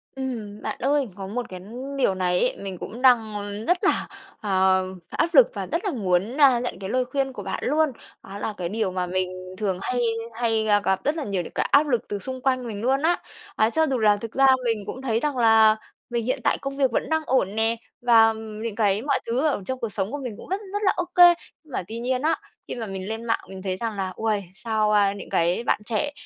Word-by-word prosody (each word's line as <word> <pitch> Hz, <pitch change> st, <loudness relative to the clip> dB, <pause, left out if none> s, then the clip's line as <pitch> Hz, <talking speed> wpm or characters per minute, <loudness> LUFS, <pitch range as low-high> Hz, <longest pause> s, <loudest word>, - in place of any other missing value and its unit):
Ừm, 230 Hz, -6 st, -5 dB
bạn -, -, -3 dB
ơi, 280 Hz, 0 st, +1 dB
có 195 Hz, -1 st, -6 dB
một 240 Hz, +4 st, -4 dB
cái 185 Hz, -, -7 dB, 0.4 s
điều 250 Hz, -8 st, +2 dB
này 180 Hz, -1 st, +1 dB
ấy, 250 Hz, -, +1 dB
mình 195 Hz, -2 st, -6 dB
cũng 230 Hz, +7 st, -8 dB
đang 235 Hz, -4 st, +4 dB, 0.3 s
rất 355 Hz, +1 st, +2 dB
là, -, -, +2 dB, 0.3 s
ờ, 190 Hz, -2 st, +3 dB, 0.2 s
áp -, -, 0 dB
lực -, -, +8 dB
và -, -, -4 dB
rất -, -, -1 dB
là 390 Hz, -, +1 dB
muốn, 200 Hz, -, 0 dB
a, 265 Hz, -4 st, +7 dB
nhận 245 Hz, -5 st, -4 dB
cái 195 Hz, -1 st, -5 dB
lời 255 Hz, +3 st, +1 dB
khuyên 270 Hz, +1 st, -2 dB
của -, -, -7 dB
bạn -, -, -4 dB
luôn. 305 Hz, +1 st, +2 dB, 0.3 s
Đó 195 Hz, +1 st, -8 dB
là 215 Hz, -, -3 dB
cái 175 Hz, -2 st, -3 dB
điều 215 Hz, -1 st, -1 dB
mà 180 Hz, 0 st, -1 dB
mình 185 Hz, 0 st, -1 dB, 0.2 s
thường 190 Hz, -3 st, -1 dB
hay 250 Hz, +3 st, -1 dB, 0.3 s
hay 225 Hz, -1 st, 0 dB, 0.2 s
gặp 190 Hz, -1 st, 0 dB
rất 295 Hz, +3 st, +1 dB
là 320 Hz, -, -3 dB
nhiều 195 Hz, -5 st, -1 dB
những -, -, -10 dB
cái -, -, 0 dB
áp 295 Hz, +2 st, +5 dB
lực 245 Hz, -5 st, 0 dB
từ 205 Hz, -, -3 dB
xung 260 Hz, +3 st, -6 dB
quanh 255 Hz, -1 st, 0 dB
mình 205 Hz, -3 st, -5 dB
luôn 265 Hz, +4 st, +2 dB
á. 335 Hz, +3 st, +3 dB, 0.4 s
A, 220 Hz, -, +3 dB
cho 320 Hz, +7 st, +2 dB
dù 265 Hz, -2 st, 0 dB
là 210 Hz, -2 st, +4 dB
thực 225 Hz, +2 st, -7 dB
ra 270 Hz, 0 st, +5 dB, 0.2 s
mình 225 Hz, -3 st, 0 dB
cũng 260 Hz, -, -6 dB
thấy 230 Hz, -4 st, 0 dB
rằng 290 Hz, 0 st, -1 dB
là 225 Hz, -2 st, +6 dB, 0.3 s
mình 235 Hz, -2 st, -2 dB
hiện 260 Hz, +3 st, 0 dB
tại -, -, +2 dB
công 275 Hz, 0 st, -4 dB
việc 270 Hz, -3 st, +2 dB
vẫn -, -, -1 dB
đang 320 Hz, 0 st, +2 dB
ổn 215 Hz, -7 st, +1 dB
nè 225 Hz, +1 st, +2 dB, 0.3 s
và 225 Hz, -2 st, +6 dB
những 220 Hz, 0 st, -6 dB
cái 205 Hz, -2 st, +2 dB
mọi 280 Hz, +2 st, +1 dB
thứ 250 Hz, +6 st, +1 dB
ở 280 Hz, -8 st, 0 dB
trong 260 Hz, +3 st, -3 dB
cuộc 230 Hz, -, -2 dB
sống 195 Hz, -1 st, -2 dB
của 290 Hz, -, -3 dB
mình 245 Hz, -4 st, -4 dB
cũng -, -, -12 dB
rất 385 Hz, +3 st, -1 dB
rất 410 Hz, -, -1 dB
là 390 Hz, -, +5 dB
ô 355 Hz, -, -1 dB
kê. 350 Hz, -1 st, +9 dB, 0.3 s
Nhưng 310 Hz, -, -19 dB
mà -, -, -1 dB
tuy 225 Hz, +2 st, -6 dB
nhiên 250 Hz, +1 st, -1 dB
á, 315 Hz, +3 st, +2 dB, 0.3 s
khi -, -, -5 dB
mà 235 Hz, -2 st, -4 dB
mình 190 Hz, -2 st, -6 dB
lên 225 Hz, +1 st, -4 dB
mạng 225 Hz, -, +1 dB
mình 190 Hz, 0 st, -8 dB
thấy 185 Hz, -1 st, -2 dB
rằng 225 Hz, +1 st, -3 dB
là 190 Hz, -2 st, -3 dB
"Uầy, 215 Hz, -2 st, 0 dB
sao, 220 Hz, -1 st, 0 dB
a, 205 Hz, -2 st, +4 dB
những 205 Hz, -, -9 dB
cái 175 Hz, +6 st, +1 dB
bạn -, -, +1 dB
trẻ 240 Hz, +7 st, -1 dB
225 Hz, 250 wpm, -24 LUFS, 200-260 Hz, 0.4 s, kê